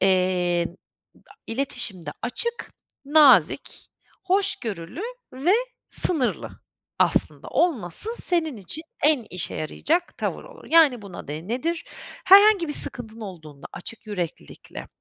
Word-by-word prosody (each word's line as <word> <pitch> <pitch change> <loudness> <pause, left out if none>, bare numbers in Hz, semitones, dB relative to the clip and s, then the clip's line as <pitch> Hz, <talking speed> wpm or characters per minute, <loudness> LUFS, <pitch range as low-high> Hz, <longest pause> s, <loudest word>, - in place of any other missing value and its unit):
eee, 180 -2 +2 0.7
a - - -15
iletişimde 205 - -3
açık, 470 - -2 0.3
nazik, 295 -1 +4 0.4
hoşgörülü 330 - -1 0.3
ve 290 +9 +2 0.4
sınırlı 295 -9 0 0.5
aslında - - +1
olması 290 - +1
senin 320 - +1
için 210 - -4 0.2
en 295 -6 +3
işe 180 -1 -4
yarayacak 325 - -2
tavır - - -3
olur. - - -14
Yani, 305 -8 +5
buna 195 -8 -10
de 155 +5 -6
nedir? 320 +8 -2 0.4
Herhangi 390 -2 +7
bir 295 - -2
sıkıntın 230 -5 0
olduğunda 155 -8 -10
açık 215 +4 -7
yüreklilikle, 175 - -6
245 Hz, 110 wpm, -24 LUFS, -, 0.7 s, Herhangi